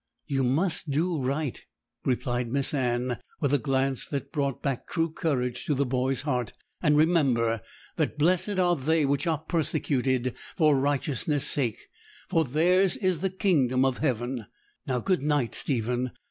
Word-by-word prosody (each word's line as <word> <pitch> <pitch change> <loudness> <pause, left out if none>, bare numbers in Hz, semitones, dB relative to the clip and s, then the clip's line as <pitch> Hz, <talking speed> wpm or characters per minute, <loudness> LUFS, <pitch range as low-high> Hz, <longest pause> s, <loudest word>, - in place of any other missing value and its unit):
'You 135 -3 0
must 160 +6 +1
do 160 +2 0
right,' 135 +1 -2 0.4
replied 120 -2 -1
Miss 140 +2 +1
Anne, 125 -2 0 0.2
with 145 -2 +1
a 145 - +4
glance 135 +2 0
that 140 -3 -4
brought 140 -3 -2
back 135 -4 -2
true 165 -2 0
courage 125 -7 -1
to 150 - +1
the 140 +1 +1
boy's 130 +1 0
heart; 125 -5 -2 0.3
'and 150 -3 +3
remember 130 - +3 0.4
that - - -1
"blessed 185 +6 +2
are 175 -1 +3
they 155 +2 +1
which 140 +2 0
are 160 -2 +2
persecuted 135 -5 0 0.2
for 155 -4 +5
righteousness' 145 +1 0
sake, 125 -7 -1 0.4
for 165 - +2
theirs 175 +7 +2
is 185 -5 +1
the 190 - 0
kingdom 145 - +2
of 130 -2 0
heaven." 120 -4 -1 0.4
Now, 125 -2 0
good 185 -7 +1
night, 145 -5 0
Stephen. 125 -1 0
140 Hz, 155 wpm, -27 LUFS, 125-160 Hz, 0.4 s, for